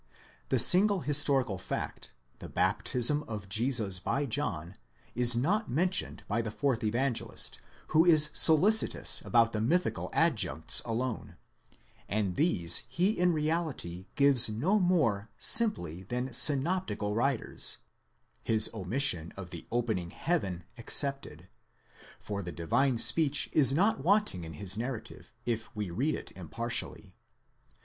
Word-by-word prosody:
The 130 - 0
single 190 - +5
historical 135 -7 +1
fact, - - -7 0.3
the - - -11
baptism 130 +4 0
of 105 -3 -8
Jesus 110 -2 +1
by 140 +9 -3
John, 100 - -4 0.4
is 120 0 +3
not 200 - -2
mentioned 180 +7 -2
by 110 +3 -2
the 110 - -6
fourth 125 +1 -3
Evangelist, 120 +3 -3 0.3
who 155 +1 +3
is 155 -3 +6
solicitous 190 +8 +7
about 115 -1 +1
the 110 - -4
mythical 175 +11 -2
adjuncts 105 - 0
alone, 120 +1 -5 0.7
and 100 -3 -3
these 85 - 0
he 175 - -1
in 180 -4 0
reality 150 - -4
gives 140 -5 +5
no 155 - -1
more 135 - -1
simply 120 - +2
than 125 +6 -5
the 130 - -9
synop 155 +9 +2
tical 105 -7 -5
writers, 130 +1 -2 0.7
his 110 -1 +2
omission 105 - 0
of 90 -3 -10
the 85 - -10
opening 110 -7 -3
heaven 95 - -4
excepted; 140 +3 -2 0.7
for 100 -1 -7
the 90 - -8
divine 120 - -2
speech 145 +3 +2
is 140 -3 +4
not 180 0 -1
wanting 190 - -1
in 80 - -10
his 95 +5 -2
narrative, 120 -1 -8
if 115 -2 -4
we 105 -4 -6
read 135 - -2
it - - -10
impartially. 115 +7 -5
125 Hz, 130 wpm, -28 LUFS, 105-155 Hz, 0.7 s, solicitous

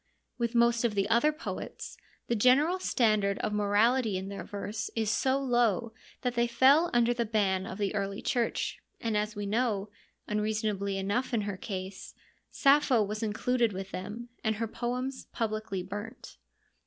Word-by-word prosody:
With 235 0 -1
most 235 0 +4
of 230 -3 +1
the 195 0 +1
other 240 +7 +4
poets, 305 - -6 0.3
the 235 - 0
general 275 - +4
standard 215 - +2
of 210 - -2
morality 210 +2 +2
in 190 +1 -5
their 200 - -6
verse 210 +2 -5
is 220 -2 +1
so 260 +3 +2
low 240 -4 +1 0.3
that 250 -2 -1
they 235 0 +2
fell 275 +8 +5
under 240 0 +3
the 235 -1 0
ban 200 -4 0
of - - -6
the 205 -1 -1
Early 200 -1 -2
Church, 240 -2 -1 0.2
and 225 -2 -1
as 210 +1 -1
we 205 0 -4
know 210 -2 0 0.2
— - - -45
unreasonably 210 -2 -1
enough 215 +6 -1
in 220 - +1
her 205 -1 -3
case 190 -1 -6 0.2
— - - -42
Sappho 275 -5 +5
was 210 +2 -4
included 230 +1 +1
with 190 +1 -6
them, 210 +6 -6
and 220 -1 +1
her 225 +2 -2
poems 250 +4 -3
publicly 215 -4 -2
burnt. 205 +4 -8
220 Hz, 170 wpm, -30 LUFS, 205-240 Hz, 0.3 s, fell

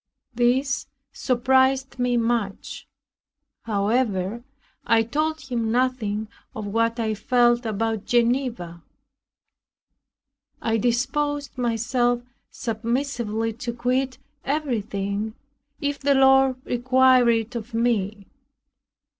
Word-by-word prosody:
This 255 +3 +1 0.2
surprised 260 +1 +1
me 245 -1 +1
much. 230 -4 -2 0.8
However, 210 0 0 0.4
I 225 0 +3
told 310 +7 -1
him 240 -5 -2
nothing 230 -4 0 0.3
of 215 - -5
what 230 +3 0
I 220 -1 0
felt 240 +2 +2
about 220 0 -2
Geneva. 235 -8 0 1.8
I 225 0 0
disposed 275 +5 -1
myself 240 0 0 0.3
submissively 230 -1 -2
to 235 +1 -5
quit 255 +2 -1 0.3
everything, 215 -7 -2 0.4
if 285 0 -2
the 280 0 +2
Lord 265 0 +5
required 255 0 +4
it 230 +1 0
of 230 0 -6
me. 215 -4 0
240 Hz, 90 wpm, -24 LUFS, 225-260 Hz, 1.8 s, Lord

